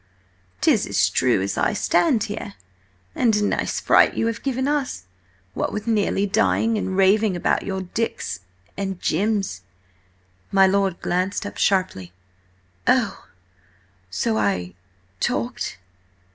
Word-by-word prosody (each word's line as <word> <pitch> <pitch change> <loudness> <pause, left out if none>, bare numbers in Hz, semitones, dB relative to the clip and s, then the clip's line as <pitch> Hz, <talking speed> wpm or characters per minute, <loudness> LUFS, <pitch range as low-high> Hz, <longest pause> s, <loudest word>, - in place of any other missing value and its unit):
"'Tis - - +3
as - - +2
true 120 -7 +2
as 100 0 -2
I - - +2
stand 200 +2 +2
here. 205 -2 -6 0.6
And 230 -3 +2
a 210 - +1
nice 205 - 0
fright - - +4
you - - 0
have 230 -2 -2
given 265 0 -1
us, 285 - -1 0.5
what - - -2
with 210 - -4
nearly 210 -3 +1
dying, 225 +2 +2
and 190 -3 -2
raving 195 +1 +4
about 175 - +1
your 190 -1 -2
Dicks 180 - -3 0.4
and 195 -1 -3
your - - -22
Jims!" 195 - 0 0.9
My 195 -1 +6
lord 190 -1 +1
glanced 185 +4 -1
up 205 - -7
sharply. 185 - 0 0.8
"Oh! - - +1 0.8
So 90 +5 -1
I–talked?" 90 -2 -3
195 Hz, 130 wpm, -23 LUFS, -, 0.9 s, My